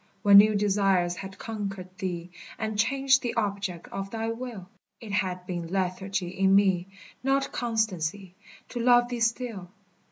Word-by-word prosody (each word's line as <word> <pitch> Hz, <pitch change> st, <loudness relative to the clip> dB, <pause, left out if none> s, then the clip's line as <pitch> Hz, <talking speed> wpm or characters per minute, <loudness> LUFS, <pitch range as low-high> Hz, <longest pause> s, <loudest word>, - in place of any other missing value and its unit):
When 200 Hz, -1 st, +9 dB
new 215 Hz, +1 st, +5 dB
desires 195 Hz, -3 st, +2 dB
had 190 Hz, 0 st, -8 dB
conquered 195 Hz, -4 st, -6 dB
thee, 175 Hz, -2 st, -4 dB, 0.3 s
And 220 Hz, -1 st, -3 dB
changed 270 Hz, +5 st, +3 dB
the 240 Hz, -1 st, -3 dB
object 200 Hz, -5 st, -2 dB
of 195 Hz, 0 st, -5 dB
thy 225 Hz, +1 st, -3 dB
will, 230 Hz, -6 st, -7 dB, 0.3 s
It 220 Hz, -3 st, -9 dB
had 185 Hz, -3 st, -1 dB
been 175 Hz, -2 st, -4 dB
lethargy 190 Hz, +1 st, -2 dB
in 190 Hz, +1 st, +3 dB
me, 190 Hz, -3 st, +3 dB, 0.3 s
Not 270 Hz, +1 st, +1 dB
constancy, 205 Hz, -6 st, -2 dB, 0.4 s
to 245 Hz, -, -5 dB
love 240 Hz, 0 st, +4 dB
thee 245 Hz, -1 st, -3 dB
still. 230 Hz, -5 st, -1 dB
200 Hz, 150 wpm, -27 LUFS, 185-230 Hz, 0.4 s, When